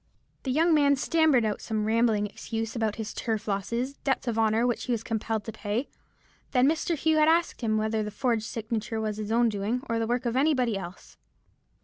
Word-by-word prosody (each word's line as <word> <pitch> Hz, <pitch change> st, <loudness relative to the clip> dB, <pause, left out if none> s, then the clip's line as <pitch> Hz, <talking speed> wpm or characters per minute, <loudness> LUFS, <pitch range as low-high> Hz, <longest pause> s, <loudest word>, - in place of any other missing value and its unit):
"The 265 Hz, -, -2 dB
young 325 Hz, +5 st, +3 dB
man 285 Hz, -2 st, +4 dB
stammered 300 Hz, -4 st, +3 dB
out 210 Hz, -1 st, -2 dB
some 215 Hz, -2 st, -2 dB
rambling 220 Hz, -1 st, +2 dB
excuse 225 Hz, +2 st, -5 dB
about 220 Hz, -3 st, 0 dB
his 220 Hz, -1 st, -5 dB
turf 220 Hz, -2 st, -3 dB
losses, 235 Hz, +7 st, -2 dB
debts 265 Hz, -2 st, -1 dB
of 225 Hz, -1 st, 0 dB
honour 220 Hz, +1 st, +3 dB
which 240 Hz, -1 st, -1 dB
he 250 Hz, -, -2 dB
was 230 Hz, -2 st, -1 dB
compelled 220 Hz, -1 st, -2 dB
to 225 Hz, -, -6 dB
pay. 220 Hz, +4 st, -3 dB, 0.6 s
Then 255 Hz, 0 st, +4 dB
Mr. 320 Hz, +2 st, 0 dB
Hugh 315 Hz, +1 st, +2 dB
asked 325 Hz, +1 st, +3 dB
him 215 Hz, -2 st, +1 dB
whether 220 Hz, 0 st, 0 dB
the 210 Hz, -, -3 dB
forged 225 Hz, 0 st, -1 dB
signature 225 Hz, 0 st, -3 dB
was 215 Hz, -1 st, -2 dB
his 215 Hz, 0 st, -4 dB
own 235 Hz, +1 st, +4 dB
doing, 220 Hz, +4 st, -2 dB
or 230 Hz, -1 st, 0 dB
the 225 Hz, -, -1 dB
work 245 Hz, +2 st, -1 dB
of 235 Hz, 0 st, -1 dB
any 295 Hz, +3 st, +3 dB
body 245 Hz, -4 st, +1 dB
else. 185 Hz, -1 st, -8 dB
230 Hz, 210 wpm, -27 LUFS, 215-260 Hz, 0.6 s, man